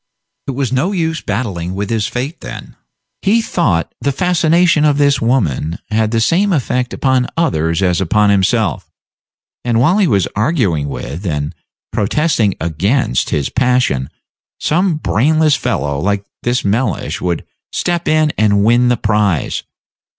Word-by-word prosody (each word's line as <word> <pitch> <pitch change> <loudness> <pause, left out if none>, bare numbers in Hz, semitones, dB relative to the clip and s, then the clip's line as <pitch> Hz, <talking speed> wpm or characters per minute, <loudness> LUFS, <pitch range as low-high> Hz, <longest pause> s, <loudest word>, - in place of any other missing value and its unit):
It 135 - -2
was 135 -2 -1
no 165 +10 +1
use 165 -3 -1
battling 100 -5 -3
with 100 +2 -3
his 110 -3 0
fate, 135 +7 -4
then, - - -9 0.5
he 210 +4 +3
thought; 115 - 0
the 140 - +1
fascination 170 0 +2
of 150 -2 +3
this 140 -2 +2
woman 85 - 0
had 110 0 +1
the 115 0 0
same 180 - +2
effect 125 -5 0
upon 130 -2 +1
others 85 - +1
as 90 -1 +1
upon 105 +3 +3
himself; 95 -2 +1 0.7
and 120 -2 +1
while 160 - +3
he 195 - +3
was 100 - +2
arguing 105 - 0
with, 80 +5 -6
and 75 0 -2 0.4
protesting 110 - +1
against, 85 - 0
his 70 -2 -1
passion, 125 - +1 0.5
some 175 +2 +1
brainless 155 +2 +2
fellow, 70 0 -2
like 100 +4 -1 0.2
this 120 -1 -1
Mellish, 110 +2 -1
would 90 -2 -2 0.3
step 175 -1 -1
in 155 -1 +2
and 100 -2 +3
win 120 +2 +4
the 125 -1 +2
prize. 105 -7 0
120 Hz, 145 wpm, -16 LUFS, 95-150 Hz, 0.7 s, win